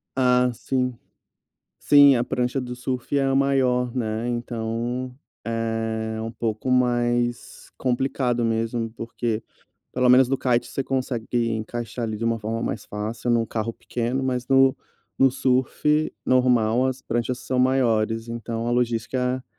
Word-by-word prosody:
Ah, 125 -1 +3
sim. 125 +1 -2 0.8
Sim, 145 -2 +7
a 120 - +1
prancha 125 +2 -1
do 125 -1 -5
surf 125 +2 -3
é 140 - +3
a 135 0 +1
maior, 130 -3 +2
né? 115 -1 -2
Então 120 +1 -3 0.3
é 115 -1 -2
um 115 - -4
pouco 115 +1 -3
mais 120 -1 0
complicado 125 -1 0
mesmo. 115 0 -1
Porque, 115 -1 -3 0.5
pelo 125 0 +2
menos 125 0 +6
no 135 - +1
kite, 125 -2 +1
você 135 - -3
consegue 130 -3 -2 0.2
encaixar 115 +1 -4
ali 110 -1 -3
de 115 - -4
uma 115 0 +1
forma 115 +2 -3
mais 110 - -3
fácil 110 +3 -4
em 120 - +4
um 115 -1 0
carro 115 +1 -3
pequeno. 120 +3 -3
Mas, 125 -2 -1
no 135 -1 +5 0.4
no 135 0 +5
surf 135 +4 +1
normal, 125 -1 +3
as 130 0 -3
pranchas 120 +2 -2
são 130 0 -2
maiores. 115 -3 +1
Então 115 0 -4
a 120 - 0
logística 125 +2 0
120 Hz, 145 wpm, -24 LUFS, 115-130 Hz, 0.8 s, Sim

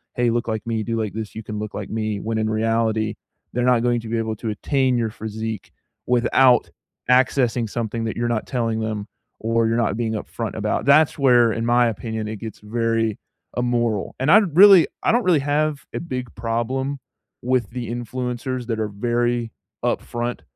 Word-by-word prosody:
"Hey, 120 -1 +2
look 120 0 -1
like 110 +1 -3
me, 110 -1 -1
do 115 +1 -2
like 105 -4 -2
this, 110 -1 -5
you 110 - -6
can 105 0 -5
look 105 0 -5
like 105 - -5
me," 110 -2 -2
when 110 +2 -2
in 110 0 0
reality, 110 0 0 0.4
they're 125 - 0
not 120 -2 +3
going 120 -1 +1
to 115 - -8
be 115 - -1
able 110 -1 -2
to 115 - -4
attain 130 +4 +1
your 115 -2 -1
physique 110 -2 -5 0.4
without 125 +1 +4 0.4
accessing 125 -2 +3
something 115 0 -3
that 110 - -3
you're 120 0 0
not 115 -2 -1
telling 115 -3 -1
them, 110 -1 -3 0.3
or 115 0 +1
you're 115 +1 +1
not 115 -4 +1
being 115 -2 -1
upfront 105 - -4
about. - - -1
That's 145 +2 +5
where, 120 -5 +5
in 115 0 -2
my 120 0 +4
opinion, 110 0 -4
it 110 -1 -5
gets 110 -1 -7
very 115 0 -1 0.4
immoral, 120 -4 0
and 135 +3 0
I'd 195 -7 +5
really 195 -3 +9 0.2
I - - +3
don't 240 +1 +2
really 175 -4 +4
have 145 0 0
a - - -3
big 125 -7 -5
problem 120 +5 -2 0.4
with 125 0 +1
the 120 -2 -5
influencers 125 +1 -4
that 115 -2 -2
are 105 - -1
very 120 +2 -1 0.3
upfront 120 0 -2
115 Hz, 190 wpm, -22 LUFS, 110-125 Hz, 0.4 s, really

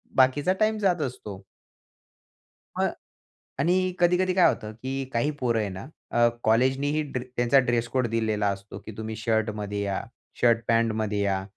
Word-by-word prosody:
बाकीचा 140 +7 +3
टाईम 215 0 +2
जात 180 -5 +1
असतो. 105 -7 -6 1.4
मग - - +2 0.7
आणि 180 +4 +2
कधी-कधी 180 +1 +3
काय 180 -1 +5
होतं, 105 0 -4
की 130 +4 -4
काही 120 +6 +1
पोरं 120 -3 +1
आहे 105 - -1
ना, 95 +3 -7 0.3
अ, 120 0 +4 0.2
कॉलेजनीही 130 +6 +2
ड्रे 125 - -3
त्यांचा 120 +3 +4
ड्रेस 120 -2 0
कोड 130 -2 0
दिलेला 110 -2 0
असतो, 100 +1 -6
की 110 - -7
तुम्ही 110 0 -5
शर्टमध्ये 105 -2 -1
या, 100 -1 -2 0.4
शर्ट 115 -1 +5
पॅन्टमध्ये 110 -2 +1
या. 95 -1 0
120 Hz, 150 wpm, -26 LUFS, 110-140 Hz, 1.4 s, काय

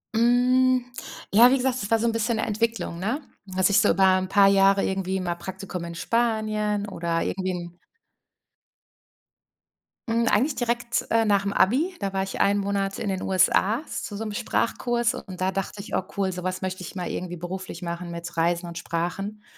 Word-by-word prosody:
Hm, 250 +2 +3 0.5
ja, 235 +4 +8
wie 270 - +3
gesagt, 255 -1 0
das 200 - -4
war 225 - +4
so 225 - -1
'n 230 - +3
bisschen 230 +1 0
'ne - - 0
Entwicklung, 225 -5 -2
ne? 225 +9 -1 0.3
Dass 190 +1 +1
ich 200 - +5
so - - +3
über 190 +3 +3 0.2
'n 185 0 -4
paar 200 -1 +6
Jahre 195 0 +4
irgendwie 190 0 -1
mal 175 -2 -1
Praktikum 185 +1 -6
in 170 0 -7
Spanien 215 -1 0
oder 170 -3 -2
irgendwie 185 0 -2
'n 175 0 -7 2.3
Hm, 230 0 +1
eigentlich 260 +8 +2
direkt, 240 0 -1
äh, 225 0 +4
nach 200 -2 +2
dem 200 0 -2
Abi. 300 - +2
Da 195 -1 -1
war 190 0 -1
ich 195 - -3
einen 200 +1 +3
Monat 195 0 -1
in 220 - -3
den 190 -1 -2
USA 195 +5 +2
zu 205 - -5
so 225 - -4
'nem 215 - -4
Sprachkurs. 235 +1 0
Und 185 -2 -8
da 185 +1 +1
dachte 195 +2 -4
ich: 200 - -5
„Oh - - 0
cool, 190 -1 +1
sowas 185 +1 -4
möchte 185 0 -4
ich 180 - -8
mal 180 -1 -3
irgendwie 175 -1 -4
beruflich 180 0 -6
machen 170 0 -5
mit 170 0 -7
Reisen 170 +1 +1
und 170 0 -8
Sprachen.“ 195 +6 -4
195 Hz, 195 wpm, -25 LUFS, 185-225 Hz, 2.3 s, ja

